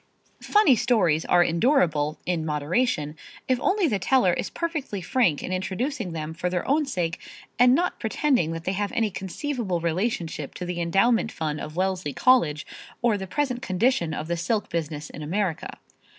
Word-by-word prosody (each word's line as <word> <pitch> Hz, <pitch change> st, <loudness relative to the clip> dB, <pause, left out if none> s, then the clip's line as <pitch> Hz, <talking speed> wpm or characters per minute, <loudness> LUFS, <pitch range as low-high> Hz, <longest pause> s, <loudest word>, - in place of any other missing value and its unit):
Funny 415 Hz, -11 st, +4 dB
stories 200 Hz, -10 st, +2 dB
are 175 Hz, -, +5 dB
endurable, 165 Hz, -, +2 dB
in 175 Hz, -3 st, -1 dB
moderation, 150 Hz, -, 0 dB, 0.3 s
if 255 Hz, -1 st, +2 dB
only 385 Hz, +2 st, +2 dB
the 210 Hz, -8 st, 0 dB
teller 190 Hz, -2 st, +3 dB
is -, -, -2 dB
perfectly 310 Hz, -, -3 dB
frank 185 Hz, -, +1 dB
in 185 Hz, -, -3 dB
introducing 195 Hz, -, -2 dB
them 160 Hz, -1 st, -5 dB
for 180 Hz, +2 st, -2 dB
their 180 Hz, -1 st, -2 dB
own 295 Hz, +2 st, +2 dB
sake 175 Hz, -9 st, -2 dB, 0.4 s
and 250 Hz, +1 st, +6 dB
not 355 Hz, +4 st, 0 dB
pretending 245 Hz, -, +1 dB
that 165 Hz, 0 st, -5 dB
they 185 Hz, -, -1 dB
have 200 Hz, +1 st, -2 dB
any 225 Hz, -2 st, +1 dB
conceivable 195 Hz, -, -3 dB
relationship 170 Hz, -, -2 dB
to 180 Hz, -, -5 dB
the 175 Hz, -1 st, -3 dB
endowment 220 Hz, +7 st, +2 dB
fund 155 Hz, -2 st, -3 dB
of 155 Hz, -, -7 dB
Wellesley 185 Hz, -5 st, -1 dB
College, 165 Hz, -, +3 dB, 0.4 s
or 235 Hz, -3 st, +3 dB
the 190 Hz, -1 st, -5 dB
present 255 Hz, 0 st, -1 dB
condition 185 Hz, -5 st, +1 dB
of 155 Hz, -, -4 dB
the 170 Hz, -, -1 dB
silk 205 Hz, +6 st, -1 dB
business 155 Hz, -2 st, -4 dB
in 155 Hz, -, -9 dB
America. 175 Hz, +2 st, -2 dB
185 Hz, 170 wpm, -25 LUFS, 165-245 Hz, 0.4 s, and